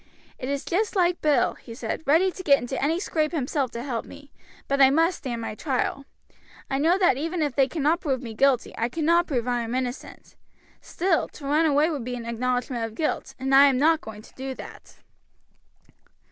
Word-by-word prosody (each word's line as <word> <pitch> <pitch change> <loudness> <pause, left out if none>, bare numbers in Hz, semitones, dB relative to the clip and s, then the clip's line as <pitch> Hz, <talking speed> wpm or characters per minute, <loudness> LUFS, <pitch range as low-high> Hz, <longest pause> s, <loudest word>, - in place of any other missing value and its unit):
"It 255 - -4
is 280 -1 -2
just 415 +5 -1
like 355 -2 +2
Bill," 300 -2 +2
he 230 - -12
said, 270 - -4
"ready 335 +6 +4
to 370 - -8
get 285 -6 +5
into 265 +2 -4
any 320 +4 +1
scrape 310 -5 -1
himself 280 -3 -1
to 235 - -5
help 250 -4 -3
me: 285 0 -14 0.4
but 275 0 +1
I 265 - +8
must 330 +5 +2
stand 240 -4 -4
my 225 - -4
trial. 275 +2 -2 0.7
I 270 - 0
know 330 +5 +3
that 360 -9 +3
even 325 +3 -2
if 290 -4 -2
they 270 -2 +4
cannot 310 +3 0
prove 270 -7 -1
me 235 -3 -7
guilty 265 +2 +2
I 230 +1 0
cannot 335 +5 +2
prove 250 -4 -2
I 245 -1 0
am 230 +1 -4
innocent; 255 +1 -5 0.5
still, 355 -2 0
to 285 - -12
run 305 +3 +3
away 300 +3 +3
would 285 -6 -4
be 245 +1 -4
an 235 -1 -7
acknowledgment 245 +1 -2
of 225 -1 -5
guilt, 310 - -2
and 265 +1 -2
I 275 +1 +8
am 265 -2 +2
not 320 +4 +3
going 215 -1 -10
to - - -17
do 265 0 -6
that." - - -12
275 Hz, 210 wpm, -25 LUFS, 250-320 Hz, 0.7 s, I